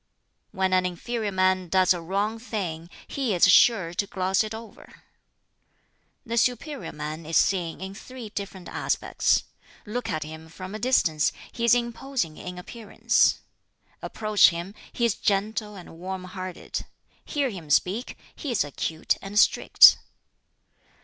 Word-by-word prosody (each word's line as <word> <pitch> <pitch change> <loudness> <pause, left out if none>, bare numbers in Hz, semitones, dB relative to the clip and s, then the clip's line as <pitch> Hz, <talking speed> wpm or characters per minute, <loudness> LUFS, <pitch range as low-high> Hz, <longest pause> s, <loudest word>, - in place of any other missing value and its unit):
"When 190 -2 0
an 185 0 +4
inferior 205 +5 -3
man 185 -1 +1
does 185 +1 +4
a 175 - -5
wrong 200 +6 -2
thing, 175 -8 -5 0.2
he 255 -8 -1
is 175 - +5
sure 185 -6 +5
to 200 +3 -1
gloss 190 0 +1
it 215 - -6
over. 225 0 -13 1.2
"The 235 0 0
superior 250 +4 -1
man 155 +2 -6
is 160 +1 0
seen 175 -4 +1
in 190 +1 -6
three 245 +2 -9
different 200 -3 -7
aspects: - - 0 0.4
look 240 +4 -4
at 155 - -2
him 160 +1 -10
from 185 +4 -9
a 215 - -5
distance, 165 - +2 0.2
he 235 - -2
is 235 - +6
imposing 235 - -2
in 180 0 -7
appearance; 210 +4 +1 0.6
approach 215 -2 +4
him, 170 +3 -6 0.2
he 235 - 0
is 230 - +2
gentle 210 +1 -1
and 175 -3 -12
warm 185 +1 -5
hearted; 185 0 -6 0.4
hear 280 -4 -1
him 170 -7 -9
speak, 195 - +1 0.2
he 295 - -6
is 235 - +2
acute 160 +2 -2
and 195 +1 -6
strict. - - +7
195 Hz, 145 wpm, -25 LUFS, 175-225 Hz, 1.2 s, strict